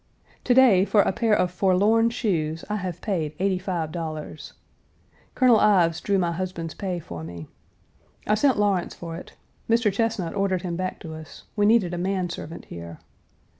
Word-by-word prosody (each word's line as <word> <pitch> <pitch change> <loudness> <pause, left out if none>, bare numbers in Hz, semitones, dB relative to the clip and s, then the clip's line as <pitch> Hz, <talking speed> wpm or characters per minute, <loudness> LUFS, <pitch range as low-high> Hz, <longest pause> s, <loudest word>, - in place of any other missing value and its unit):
To 245 - +3
day, 240 -8 +6
for 205 0 +4
a - - +1
pair 220 +2 +2
of 180 -2 +1
forlorn 200 +5 +3
shoes 165 -9 -2
I 210 +1 -2
have 180 -3 -5
paid 160 -7 -2
$85. 170 -5 -3 0.8
Colonel 250 -4 +5
Ives 175 -5 +3
drew 200 -1 +1
my 175 -2 +1
husband's 170 -2 -4
pay 185 -3 -3
for 85 - -8
me. 85 0 -8 0.8
I 210 - +2
sent 260 +4 +3
Lawrence 200 -4 0
for 165 -1 -7
it 170 - -10 0.4
(Mr. 230 -3 +3
Chesnut 205 -5 -1
ordered 195 -3 0
him 175 -2 -3
back 185 +1 -3
to 160 - -7
us; 155 -1 -11
we 205 -1 +3
needed 210 -6 +3
a 175 - -3
man 185 -1 -1
servant 165 -1 -8
here). 85 -1 -9
185 Hz, 170 wpm, -24 LUFS, 165-205 Hz, 0.8 s, day